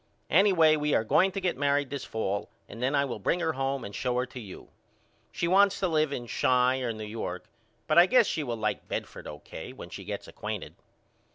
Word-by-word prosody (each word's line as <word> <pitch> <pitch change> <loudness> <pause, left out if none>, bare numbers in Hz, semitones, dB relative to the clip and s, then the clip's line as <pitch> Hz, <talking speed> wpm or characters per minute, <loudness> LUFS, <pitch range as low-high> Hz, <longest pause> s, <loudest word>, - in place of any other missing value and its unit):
Anyway 165 -4 +5
we 150 -1 +1
are - - +2
going 185 - +3
to 195 - -3
get 185 -2 0
married 145 -1 +1
this 140 -2 -4
fall 100 -2 -3 0.2
and 115 - -10
then 135 +3 +1
I 140 0 +3
will 120 -5 -5
bring 170 - 0
her 160 -2 0
home 135 0 -2
and 100 - -8
show 125 +3 -1
her 125 - +1
to 125 0 -10
you. 105 -5 -10 0.6
She 170 - -1
wants 195 +2 +4
to 190 - +1
live 155 -3 +1
in 120 -4 -4
Chi 125 +2 +2
or 125 -3 -1
New 110 -1 -6
York 110 +2 -5 0.4
but - - +5
I 175 - +7
guess 250 0 +5
she 160 - -1
will 120 -5 -3
like 105 -1 -2
Bedford - - -5
O.K. 75 -1 -9
when - - -10
she - - -7
gets - - -6
acquainted. - - -6
140 Hz, 220 wpm, -28 LUFS, 115-165 Hz, 0.6 s, I